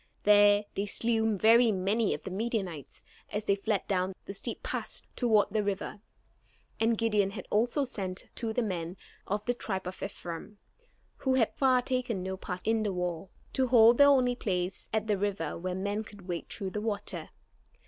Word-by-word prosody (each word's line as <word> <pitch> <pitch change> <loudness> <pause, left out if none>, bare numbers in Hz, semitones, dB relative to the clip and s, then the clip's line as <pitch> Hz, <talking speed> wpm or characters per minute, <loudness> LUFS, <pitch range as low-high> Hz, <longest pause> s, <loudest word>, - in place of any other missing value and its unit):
There 205 0 +6
they 200 +1 -2
slew 225 0 +1
very 230 +3 +6
many 200 +3 +1
of - - -10
the 190 - -6
Midianites 195 - -3 0.3
as 210 +1 -3
they 200 - +3
fled 205 0 -1
down 185 -1 0
the 195 - -6
steep 195 - -6
pass - - -3
toward 220 -5 +3
the 215 0 +1
river. 200 0 -3 0.8
And 225 0 +2
Gideon 210 -3 +2
had 195 -1 -7
also 240 +7 +2
sent 190 -6 -5
to 230 -2 -2
the 245 +2 0
men 180 -3 -3 0.3
of 205 +2 -2
the 245 - +1
tribe 190 -6 -3
of 180 +1 -7
Ephraim, 195 +1 -6 0.6
who 265 -1 +1
had 235 -4 +3
thus - - -29
far 260 -2 +4
taken 245 -7 -1
no 190 0 -3
part 180 -1 -6
in 225 0 +2
the 210 -2 0
war, 180 0 -3 0.2
to 260 -1 +2
hold 235 0 +6
the 285 - +9
only 255 -3 +4
place 185 -4 -2
at 220 -1 0
the 210 -3 0
river 195 -6 -1
where 180 +1 -3
men 200 +3 -2
could 205 -3 -13
wade 175 -2 -4
through 195 -3 -4
the 210 - -3
water. 205 -2 -3
205 Hz, 190 wpm, -30 LUFS, 190-225 Hz, 0.8 s, the